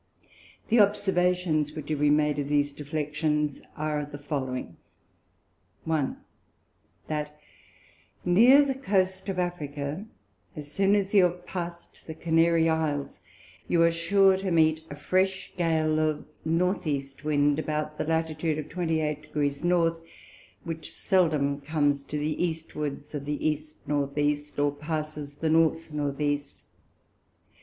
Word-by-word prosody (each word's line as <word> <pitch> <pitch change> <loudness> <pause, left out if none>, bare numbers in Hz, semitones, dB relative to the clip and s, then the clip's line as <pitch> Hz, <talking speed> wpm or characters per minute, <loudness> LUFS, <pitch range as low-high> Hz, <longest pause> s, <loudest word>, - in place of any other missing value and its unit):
The 230 +1 +4
Observations 180 -6 +2
which 155 -1 -7
have 155 -2 -1
been 150 0 +4
made 150 -1 +1
of 140 - -2
these 145 -1 +2
Deflections, 150 0 -1 0.2
are 150 -1 -1
the 145 0 -8
following. 135 -3 -4 1.1
1. 155 -4 -1 0.9
That 150 -1 -4 0.9
near 240 +11 +7
the 275 -1 0
Coast 190 -6 0
of 190 - -2
Africa, 155 0 -3 0.5
as 145 -1 -8
soon 195 +4 +3
as 200 -1 0
you 195 -3 +7
have 175 0 -3
pass'd 170 -2 -7
the 160 - -6
Canary 165 0 +3
Isles, 155 -3 -1 0.5
you 170 -1 +3
are 170 - +5
sure 190 +3 +4
to 190 0 -3
meet 160 -2 +3
a 145 - -6
fresh 185 +5 0
Gale 160 -3 +1
of 155 -1 0 0.2
North 175 +3 0
East 140 -1 -3
Wind, 145 0 +2
about 150 -1 -3
the - - +1
Latitude 160 -1 0
of 155 -1 -5
28 160 -3 -1
Degrees 150 -1 -2
North, 170 -1 +2 0.6
which 165 -2 -6
seldom 150 -6 +1
comes 145 -1 +1
to 150 - -4
the 150 +3 -1
Eastwards 150 -3 -4
of 145 -2 -4
the 150 +1 -1
East 150 0 -3
North 140 -1 -1
East, 145 0 0
or 145 0 +2
passes 150 -1 -5
the 160 +2 -1
North 160 0 +2
North 145 -1 -2
East. 145 -1 -2
155 Hz, 140 wpm, -27 LUFS, 145-170 Hz, 1.1 s, near